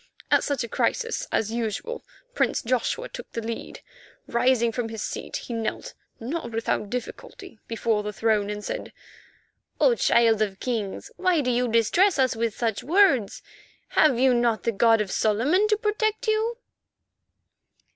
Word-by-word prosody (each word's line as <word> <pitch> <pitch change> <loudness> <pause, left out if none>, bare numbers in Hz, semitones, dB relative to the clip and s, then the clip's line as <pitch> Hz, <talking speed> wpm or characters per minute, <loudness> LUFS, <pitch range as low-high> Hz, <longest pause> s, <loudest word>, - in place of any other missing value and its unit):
At - - +4
such 280 -4 -1
a - - -4
crisis, 465 - -1
as 220 0 0
usual, 235 - -3 0.3
Prince - - 0
Joshua 255 - -1
took - - -10
the - - -3
lead. 230 0 -6 0.4
Rising 235 -1 +2
from 225 0 -3
his 225 -2 -5
seat, - - -5
he 240 - -5
knelt, 225 -1 -4 0.3
not 240 +1 -4
without 225 -2 -2
difficulty, 250 - -7
before 225 -2 0
the 210 0 -4
throne, 210 -1 +1
and 210 0 -5
said: - - -5 0.9
"O - - +5
Child 230 - +3
of 195 -3 -1
Kings, 220 -6 -3
why 365 -4 +2
do 250 -2 0
you 245 +1 +1
distress 235 - +3
us 260 -2 +2
with 230 -2 -2
such 225 -3 -1
words? 305 - +3 0.5
Have 300 -6 +4
you 260 0 +4
not 240 -2 +1
the 230 - +1
God 225 +1 +4
of 200 -3 -3
Solomon 270 - +2
to 425 0 +2
protect 435 +1 -1
you?" 440 +2 +1
235 Hz, 155 wpm, -25 LUFS, 225-330 Hz, 0.9 s, O